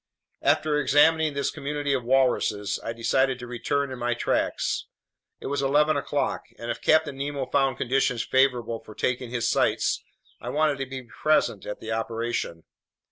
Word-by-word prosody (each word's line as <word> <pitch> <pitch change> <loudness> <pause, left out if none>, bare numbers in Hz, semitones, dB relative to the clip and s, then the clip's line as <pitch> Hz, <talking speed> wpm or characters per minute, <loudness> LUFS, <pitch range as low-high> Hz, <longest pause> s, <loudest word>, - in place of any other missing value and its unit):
After 150 -1 +2
examining 155 +1 +4
this 140 -1 0
community 145 0 -2
of 130 -3 0
walruses, 115 -6 +1
I 115 - -3
decided 130 +3 +1
to 125 - -8
return 130 +3 -2
in 130 - -6
my 120 0 0
tracks. - - -1 0.5
It - - -11
was 140 +1 -1
eleven 150 +3 +3
o'clock, 140 0 -1
and 115 - -4
if - - -6
Captain 155 -3 +3
Nemo 140 -1 -3
found 135 -1 +1
conditions 125 -2 +1
favorable 125 -4 +1
for 110 - -13
taking 125 -1 -1
his 120 -1 -1
sights, - - +1 0.4
I 120 - -6
wanted 150 +1 +1
to 135 - -3
be 130 0 -6
present 120 -4 0
at 105 - -5
the 110 - -5
operation. 115 -6 -2
130 Hz, 165 wpm, -26 LUFS, 120-140 Hz, 0.5 s, examining